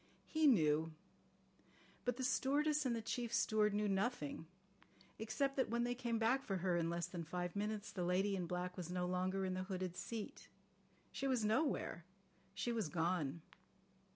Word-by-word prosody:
He 315 -1 +3
knew. 160 - +4 1.1
But 245 -1 0
the 260 - -2
stewardess 290 +3 +2
and 235 - +1
the 225 - -3
chief 235 +1 -2
steward 215 -3 +3
knew 210 0 +2
nothing, 195 - -1 0.7
except 250 +6 0
that 260 - +2
when 235 +1 +1
they 245 0 +1
came 240 -2 -1
back 230 +4 +3
for 195 - -1
her 180 0 +1
in 165 -1 +1
less 170 0 -1
than 175 -2 -5
five 175 +3 -3
minutes 210 +1 -2
the 185 - -4
lady 190 +3 +2
in 180 -2 -2
black 180 +1 -2
was 175 -3 -5
no 180 0 -1
longer 185 +2 0
in 185 - -1
the 185 0 -2
hooded 185 -2 -3
seat. 205 +4 -5 0.6
She 275 - -2
was 250 -5 +2
nowhere. 220 - +1 0.5
She 200 +5 -1
was 220 -8 -1
gone. 165 -2 0
200 Hz, 175 wpm, -39 LUFS, 180-235 Hz, 1.1 s, knew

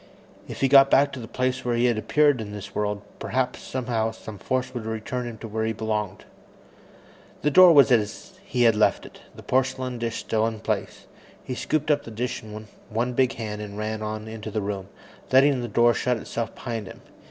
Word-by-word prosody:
If - - -8
he 135 - +4
got 135 0 +7
back 140 +1 +4
to 135 - -7
the 115 - -7
place 130 +1 -1
where 120 -1 0
he 120 +1 +2
had 120 -2 +3
appeared 145 +4 +2
in 105 -1 -7
this 100 -1 -8
world, 105 -1 -2 0.2
perhaps 130 -1 -1
somehow 120 -4 -2
some 110 -2 -10
force 130 -1 -2
would 115 -3 -5
return 110 +3 -3
him 115 -2 -7
to 115 - -8
where 110 +1 -2
he 110 0 0
belonged. 105 -3 -3 1.2
The 150 - +2
door 185 +2 +9
was 140 -4 +6
as 110 -3 0
he 125 -3 0
had 115 -2 +5
left 105 - +2
it, - - -13 0.2
the - - -12
porcelain 130 -1 -1
dish 115 -1 -2
still 110 0 0
in 110 -1 -4
place. - - -3 0.4
He 130 - -5
scooped 150 +4 0
up 145 -1 +2
the - - -9
dish 115 +3 -3
in 110 0 -9 0.2
one 120 +3 -1
big 130 0 +2
hand 105 -2 -5
and 105 -1 -7
ran 110 0 -3
on 110 0 -4
into 110 0 -7
the 110 - -2
room, 100 -1 -4 0.4
letting 135 0 +5
the 120 - -3
door 120 +2 +4
shut 125 0 0
itself 115 +1 -5
behind 115 -5 -5
him. - - -11
115 Hz, 210 wpm, -25 LUFS, 110-130 Hz, 1.2 s, door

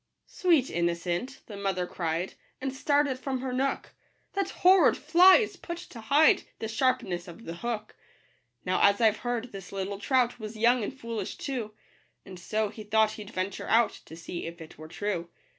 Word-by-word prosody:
" - - -54
Sweet 330 -9 +2
innocent," 170 +8 -2
the 210 - -9
mother 195 -2 -1
cried, 170 0 -3 0.3
And 265 0 -3
started 285 -1 +1
from 260 -1 -3
her 260 -1 -3
nook, 270 +2 -1 0.2
" - - -43
That 395 -1 -1
horrid 370 -5 +5
fly 350 +5 +7
is 415 -4 +1
put 340 -1 -6
to 240 -8 -10
hide 285 +8 +5 0.2
The 220 - -4
sharpness 225 -7 0
of 180 +7 -11
the 165 +1 -6
hook." 220 0 -4 0.7
Now, 185 0 +1
as 200 0 +5
I've 220 -2 +4
heard, 245 0 -3
this 195 -2 -9
little 195 0 -4
trout 250 +1 +1
Was 215 0 -7
young 235 +1 +3
and - - -3
foolish 230 -4 -4
too; 235 -6 -4 0.5
And 185 -2 -10
so 215 +4 -1
he 215 +1 -9
thought 215 +1 +3
he'd 210 -2 -9
venture 190 -2 -4
out, 230 +1 +4
To 160 - -11
see 170 +1 -6
if 170 +1 -8
it 160 -1 -11
were 155 +1 -10
true. 175 0 -3
220 Hz, 190 wpm, -28 LUFS, 190-260 Hz, 0.7 s, fly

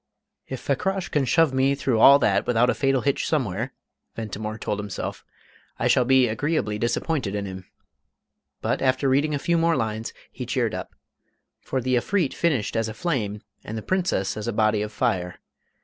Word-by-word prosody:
"If 130 - -5
Fakrash 190 +9 -1
can 145 -3 +1
shove 160 +2 +3
me 135 +1 +2
through 130 -4 0
all 140 +5 +9
that 100 -8 +1
without 125 +1 +3
a - - 0
fatal 135 -2 +1
hitch 140 -1 0
somewhere," 120 - -1 0.4
Ventimore 110 0 -5
told 105 -1 -3
himself, 105 -1 -5 0.5
"I - - 0
shall 125 - +4
be 130 0 +5
agreeably 110 -2 -1
disappointed 120 -2 -1
in 100 -1 -2
him," 95 -1 -8 0.9
But, - - -1
after 130 +1 +2
reading 145 +3 +2
a - - 0
few 170 +4 +1
more 165 0 +3
lines, 110 -2 -2 0.2
he - - -7
cheered - - 0
up. - - -6 0.6
For 130 - -3
the 130 +1 +1
Efreet 175 +4 0
finished 145 -13 0
as 115 -1 0
a 110 - -7
flame, 110 -11 -2 0.2
and 110 - -6
the 110 - -5
Princess 180 - 0
as 110 +1 -5
a 120 - -1
"body 110 -1 +2
of 105 0 -3
fire." 90 -4 -1
125 Hz, 180 wpm, -24 LUFS, 105-140 Hz, 0.9 s, all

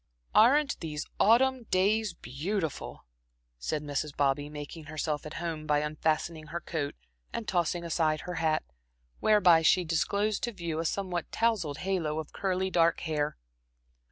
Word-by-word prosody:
"Aren't 280 +6 +5
these 150 -2 -4
autumn 250 +3 +4
days 205 +1 +2
beautiful!" 155 - -4 0.5
said 150 - -2
Mrs. 145 0 -3
Bobby, 145 +1 +1
making 150 +2 -8
herself 155 0 -3
at 155 - -8
home 160 -3 -4
by 150 0 +3
unfastening 155 +1 -1
her 170 - -4
coat 155 -4 -3 0.4
and 225 - -4
tossing 175 -1 0
aside 160 -2 +1
her 180 - -5
hat, 155 -1 +2 0.6
whereby 185 -6 +5
she 170 +3 +4
disclosed 200 +6 0
to 235 - -2
view 170 -4 -3
a 165 - -2
somewhat 180 -1 -2
tousled 205 -11 +1
halo 170 -6 0
of 160 -2 -5
curly 190 -1 -1
dark 170 -1 +3
hair. 150 -2 -1
165 Hz, 145 wpm, -29 LUFS, 155-195 Hz, 0.6 s, Aren't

